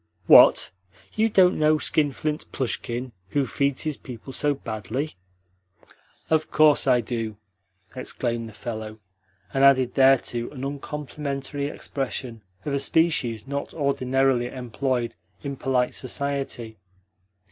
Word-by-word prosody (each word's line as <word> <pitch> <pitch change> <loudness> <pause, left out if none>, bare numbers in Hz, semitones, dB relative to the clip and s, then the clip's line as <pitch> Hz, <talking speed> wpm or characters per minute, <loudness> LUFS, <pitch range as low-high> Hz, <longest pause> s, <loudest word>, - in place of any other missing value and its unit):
"What? - - +7 0.4
You 220 +1 +2
don't 185 -4 +4
know 155 0 +4
skinflint 150 0 -1
Plushkin 125 -1 -3 0.2
who 140 +6 +1
feeds 140 +2 -1
his 155 -2 -2
people 130 +1 -9
so 145 +1 +1
badly?" 115 +4 -4 1.2
"Of 155 -1 +2
course 155 -2 +4
I 125 -2 +4
do!" 115 -2 -4 0.6
exclaimed 120 -2 -3
the - - -14
fellow, 110 -1 -6 0.6
and 135 - +2
added 130 -2 +5
thereto 130 -3 +3
an 130 -3 -8
uncomplimentary 140 0 -4
expression 130 -5 -4 0.2
of 145 - -2
a 140 - +1
species 135 -7 +1
not 140 +1 -4
ordinarily 135 -3 +1
employed 125 0 -2 0.3
in 140 -1 -4
polite 125 -1 0
society. 135 -5 -3
135 Hz, 115 wpm, -25 LUFS, 120-145 Hz, 1.2 s, What